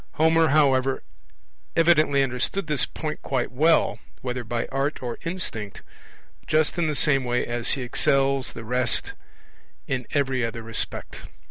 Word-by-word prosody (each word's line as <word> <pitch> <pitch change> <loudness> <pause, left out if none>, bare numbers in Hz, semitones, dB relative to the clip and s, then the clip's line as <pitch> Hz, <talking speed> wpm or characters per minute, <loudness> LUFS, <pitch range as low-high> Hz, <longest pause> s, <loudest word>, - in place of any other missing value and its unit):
Homer, 160 +1 +3
however, 135 -3 +2 0.7
evidently 155 -4 +4
understood 130 +9 -1
this 150 -7 +2
point 155 -1 -5
quite 130 -2 -2
well, 155 +6 +2 0.2
whether 125 -1 -4
by 115 0 -2
art 135 +1 -2
or 120 -2 -4
instinct, 140 - -3 0.6
just 155 0 +2
in 170 - +1
the 150 - -1
same 135 -2 +2
way 125 0 0
as 120 0 +2
he 135 - -2
excels 135 +1 +1
the 115 - -8
rest 125 +1 +1 0.7
in 125 -3 -3
every 135 -3 0
other 115 0 -4
respect. 115 -1 -3
135 Hz, 140 wpm, -24 LUFS, 125-150 Hz, 0.7 s, evidently